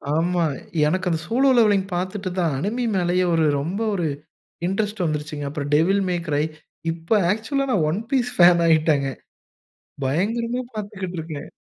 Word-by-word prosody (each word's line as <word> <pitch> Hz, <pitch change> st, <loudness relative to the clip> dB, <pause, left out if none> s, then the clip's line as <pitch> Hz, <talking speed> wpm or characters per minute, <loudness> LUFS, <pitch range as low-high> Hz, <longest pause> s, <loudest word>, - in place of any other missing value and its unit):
ஆமா 175 Hz, +2 st, +1 dB, 0.4 s
எனக்கு 185 Hz, +3 st, 0 dB
அந்த 165 Hz, -2 st, 0 dB
சோலோ 260 Hz, +4 st, +3 dB
லெவலிங் 205 Hz, -4 st, +4 dB
பாத்துட்டு 185 Hz, +2 st, -2 dB
தான் 160 Hz, -6 st, +1 dB
அனிமி 230 Hz, -, -1 dB
மேலேயே 180 Hz, 0 st, +2 dB
ஒரு 165 Hz, -1 st, +3 dB
ரொம்ப 170 Hz, +8 st, -3 dB
ஒரு 175 Hz, -5 st, 0 dB, 0.6 s
இன்ட்ரெஸ்ட் 205 Hz, +1 st, -1 dB
வந்துருச்சுங்க. 150 Hz, -1 st, -3 dB
அப்பறம் 145 Hz, 0 st, -4 dB
"டெவில் 190 Hz, +6 st, +3 dB
மே 180 Hz, -, +1 dB
க்ரை", 145 Hz, -1 st, +1 dB, 0.5 s
இப்ப 165 Hz, +6 st, 0 dB
ஆக்சுவலா 250 Hz, +7 st, -1 dB
நா -, -, +3 dB
"ஒன் 170 Hz, +6 st, -1 dB
பீஸ்" 250 Hz, -2 st, +1 dB
ஃபேன் 175 Hz, -1 st, +6 dB
ஆயிட்டேங்க. 155 Hz, -4 st, +3 dB, 1.0 s
பயங்கரமா 230 Hz, -, 0 dB
பாத்துக்குட்ருக்கேன். 185 Hz, -8 st, -6 dB
180 Hz, 140 wpm, -23 LUFS, 160-210 Hz, 1.0 s, ஃபேன்